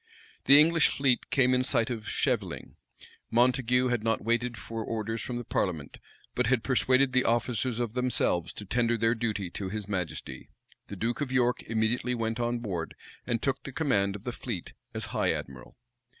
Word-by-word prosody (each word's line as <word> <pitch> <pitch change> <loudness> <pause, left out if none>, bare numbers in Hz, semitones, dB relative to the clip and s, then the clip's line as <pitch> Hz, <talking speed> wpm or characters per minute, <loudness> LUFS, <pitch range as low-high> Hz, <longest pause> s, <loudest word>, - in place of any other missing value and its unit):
The 140 +1 +10
English 165 +1 +5
fleet 135 -3 0
came 130 -2 +3
in 125 0 +2
sight 115 -2 +1
of 110 -3 -5
Scheveling. - - -1 0.6
Montague 125 +1 +3
had 120 -3 0
not 115 -2 0
waited 120 +1 0
for 115 +3 -5
orders 110 0 -3
from 125 - -4
the 120 - -4
parliament; 85 -9 -2 0.3
but - - 0
had 125 -2 +2
persuaded 130 0 +2
the 130 - +4
officers 120 +1 0
of 120 -3 -2
themselves 125 -9 0
to 105 - -8
tender 120 +3 +1
their 115 +1 +2
duty 110 -6 -2
to 95 -2 -4
his 105 0 -5
majesty. 90 -5 -5 0.4
The 100 - -7
duke 115 +7 -2
of 140 -3 -2
York 125 -1 +2
immediately 115 +3 0
went 115 0 -2
on 120 0 0
board, 95 -8 -4 0.3
and 120 -2 -1
took 135 -1 0
the 135 - -7
command 115 -10 +1
of 105 - -9
the 125 - -3
fleet 115 -7 -6 0.2
as - - -1
high - - +1
admiral. 65 -2 -8
120 Hz, 180 wpm, -28 LUFS, 110-125 Hz, 0.6 s, The